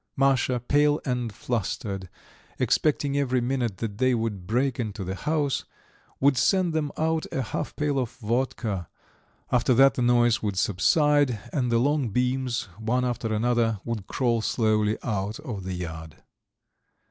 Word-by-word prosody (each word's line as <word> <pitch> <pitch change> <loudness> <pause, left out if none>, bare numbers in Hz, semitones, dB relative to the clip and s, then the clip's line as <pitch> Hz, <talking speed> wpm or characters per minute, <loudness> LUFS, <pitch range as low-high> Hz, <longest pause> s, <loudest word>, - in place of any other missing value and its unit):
Masha, 130 -2 +2
pale 145 +4 +2
and 125 -4 -1
flustered, 105 -4 -3 0.5
expecting 145 -2 +1
every 130 -3 +1
minute 120 -4 -1
that 105 0 -5
they 130 -1 +3
would 105 -6 -3
break 125 +3 0
into 105 -4 -3
the 95 +1 -3
house, 150 +4 -1 0.6
would 135 -2 +3
send 180 +5 +2
them 150 -2 -1
out 160 0 0
a 135 - -1
half - - -4
pail 145 -2 0
of 125 -3 -1
vodka; 115 - -2 0.6
after 125 0 +3
that 135 +2 +6
the - - -3
noise 120 -1 +3
would 100 -3 -2
subside 140 - +3 0.2
and 125 -5 0
the 115 - +4
long 140 0 +1
beams, 125 +2 0 0.2
one 125 +3 0
after 120 -2 -2
another, 115 -1 +1
would 115 -5 -4
crawl 120 -4 +1
slowly 110 -2 +1
out 105 0 -2
of 115 -10 -6
the 95 -1 -3
yard. 80 -3 -6
120 Hz, 150 wpm, -26 LUFS, 110-135 Hz, 0.6 s, that